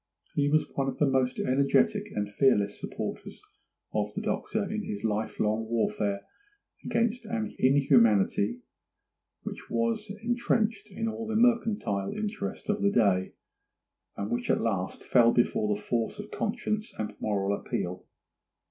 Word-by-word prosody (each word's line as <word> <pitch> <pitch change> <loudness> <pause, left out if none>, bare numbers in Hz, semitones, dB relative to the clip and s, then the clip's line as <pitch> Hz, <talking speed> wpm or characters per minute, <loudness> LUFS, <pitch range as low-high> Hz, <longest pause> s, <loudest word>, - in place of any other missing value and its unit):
He 145 0 +2
was 155 +1 +3
one 135 -1 0
of 135 - -3
the 150 - +3
most 130 -2 +1
energetic 135 +2 +2
and 105 0 -1
fearless 105 -2 +2
supporters - - -6 0.5
of - - 0
the - - -2
Doctor - - -1
in - - -3
his 100 0 -5
life 110 0 -1
long 110 +1 +1
warfare 105 -3 0 0.6
against 235 0 0
an 225 -1 -3
inhumanity 120 -5 +4 0.8
which - - -7
was 115 +8 -1
entrenched 230 -3 0
in 225 +3 -3
all 225 0 -4
the 220 - -2
mercantile 215 - +2
interest 205 -1 -4
of 210 0 0
the 200 - +4
day, 100 - +2 0.8
and 100 - -3
which 120 +1 -2
at - - +3
last 95 -5 -2
fell 120 -2 +5
before 105 -3 +2
the - - -7
force 120 - -1
of 210 +1 -8
conscience 215 0 -2
and 105 -1 -3
moral 100 -1 0
appeal. 90 -2 -4
125 Hz, 145 wpm, -28 LUFS, -, 0.8 s, fell